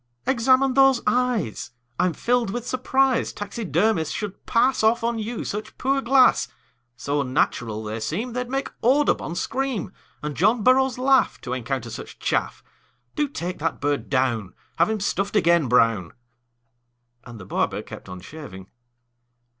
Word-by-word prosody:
"Examine 260 +1 +3
those 270 -1 +5
eyes. 235 - 0 0.3
I'm 180 -2 +2
filled 245 +2 0
with 240 +4 -4
surprise 260 0 +1
Taxidermists 205 -4 -1
should 205 -3 -6
pass 255 +2 +2
Off 225 +2 +3
on 230 -1 0
you 220 +1 -4
such 210 +1 -5
poor 275 +1 +1
glass; 260 0 +4 0.5
So 145 +3 -1
unnatural 120 -4 -1
they 110 +1 -4
seem 225 - -3
They'd 250 0 -3
make 270 +1 -2
Audubon 255 - +2
scream, 265 -2 -2 0.3
And 150 -1 -4
John 215 +5 +2
Burroughs 260 +1 +4
laugh 265 +1 +3
To 125 - -4
encounter 125 -1 -3
such 115 - -8
chaff. - - -2 0.5
Do 295 - 0
take 180 -9 -5
that 165 0 -2
bird 145 0 -1
down; 120 -8 0 0.2
Have 170 +5 +3
him 220 -1 -1
stuffed 200 +1 -1
again, 170 -6 +4
Brown!" 115 -7 +2 1.1
And 120 -2 -11
the 95 - -10
barber - - -1
kept - - -11
on 90 0 -8
shaving. 95 - -10
210 Hz, 145 wpm, -23 LUFS, -, 1.1 s, those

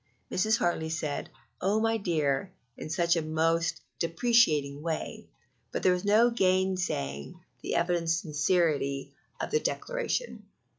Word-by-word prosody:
Mrs. 220 +4 +2
Hartley 160 -4 0
said, 155 -2 -3 0.3
"Oh, 200 +4 +2
my 225 0 +2
dear!" 160 -4 0 0.2
in 155 - -7
a 170 0 +2
most 160 +1 0 0.2
deprecating 165 - +2
way; 160 0 -4 0.4
but - - -3
there 185 - +5
was 180 +1 -2
no 220 +4 +5
gainsaying 185 - 0 0.2
the - - -3
evident 170 -1 +1
sincerity 155 -3 +1 0.3
of - - -3
the 455 - +3
declaration. - - -3
170 Hz, 120 wpm, -29 LUFS, 155-190 Hz, 0.4 s, there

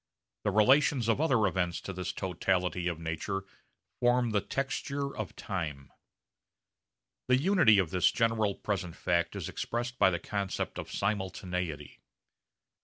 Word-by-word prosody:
The - - +3
relations 125 +4 +4
of 115 +5 +2
other 130 -9 +3
events 90 -2 0
to 95 - -6
this 90 0 -3
totality 90 -1 -1
of 85 -2 -1
nature 85 +4 -3 0.6
form 120 -1 +3
the 105 -1 +2
texture 140 +2 -3
of - - -5
time. 80 - -5 1.4
The 125 0 +5
unity 160 - +5
of 90 -5 +1
this 90 -1 +3
general 110 -3 +1
present 95 -5 -3
fact 85 -1 0
is - - -4
expressed 120 +1 -3
by - - +6
the 85 - -1
concept 100 +2 -3
of - - -7
simultaneity. 90 -6 -3
100 Hz, 135 wpm, -30 LUFS, 90-120 Hz, 1.4 s, by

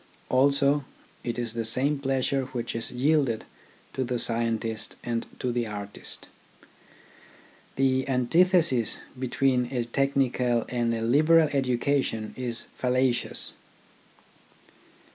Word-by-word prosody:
Also 140 +2 +3 0.4
it 120 -1 -3
is 120 -2 -2
the 115 -1 -2
same 135 +6 +1
pleasure 135 0 0
which 120 -2 -3
is 115 - -1
yielded 135 -3 +1 0.5
to 130 - -1
the 125 0 -2
scientist 115 -1 -1
and 115 -1 -2
to 125 - -1
the 120 -1 -1
artist. 105 -1 -6 1.5
The 130 0 +1
antithesis 135 - +3 0.2
between 130 0 +1
a 125 -2 -2
technical 125 -2 +1
and 120 -1 0
a 115 - -3
liberal 155 +6 +5
education 130 -4 0
is 120 -2 -3
fallacious. 125 -1 0
125 Hz, 105 wpm, -27 LUFS, 115-135 Hz, 1.5 s, liberal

